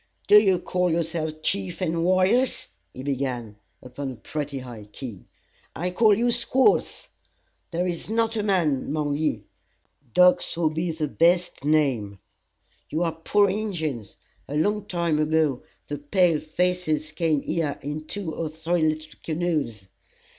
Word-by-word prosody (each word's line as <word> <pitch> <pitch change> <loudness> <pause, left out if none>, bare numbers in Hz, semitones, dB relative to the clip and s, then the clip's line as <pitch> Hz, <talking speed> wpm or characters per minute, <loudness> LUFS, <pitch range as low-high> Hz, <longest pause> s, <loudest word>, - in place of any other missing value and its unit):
"D'ye 205 -3 +7
call 180 0 0
yourselves 160 -1 -1
chiefs 190 -2 -1
and 165 -2 0
warriors?" 185 +8 +2 0.2
he 130 - -9
began, 125 -6 -3 0.3
upon 135 +2 -5
a - - -8
pretty 145 +4 -5
high 120 -5 -8
key. 105 -1 -9 0.5
"I 175 +5 -2
call 210 +2 +4
ye 240 +1 +2
squaws! 255 - +1 0.6
There 175 +1 -1
is 175 +1 -3
not 225 0 +1
a 215 - 0
man 175 -10 +1
among 150 -1 -1
ye. 145 -8 -1 0.7
Dogs 180 -2 +4
would 160 -2 +1
be 165 +3 -1
the 160 -2 -2
best 175 +2 +2
name. 135 -10 +1 0.7
You 160 +3 0
are 165 - +1
poor 205 +5 +2
Injins. 165 - -3 0.3
A 145 - -5
long 205 +6 +1
time 170 -5 0
ago, 155 -4 +1 0.2
the 145 -1 -5
pale 165 +2 +2
faces 155 -2 -1
came 155 -2 +1
here 155 -4 -1
in 150 +2 -4
two 195 -6 -4
or 160 0 -3
three 160 +2 -1
little 155 0 -1
canoes. 155 - -2
160 Hz, 145 wpm, -25 LUFS, 145-180 Hz, 0.7 s, D'ye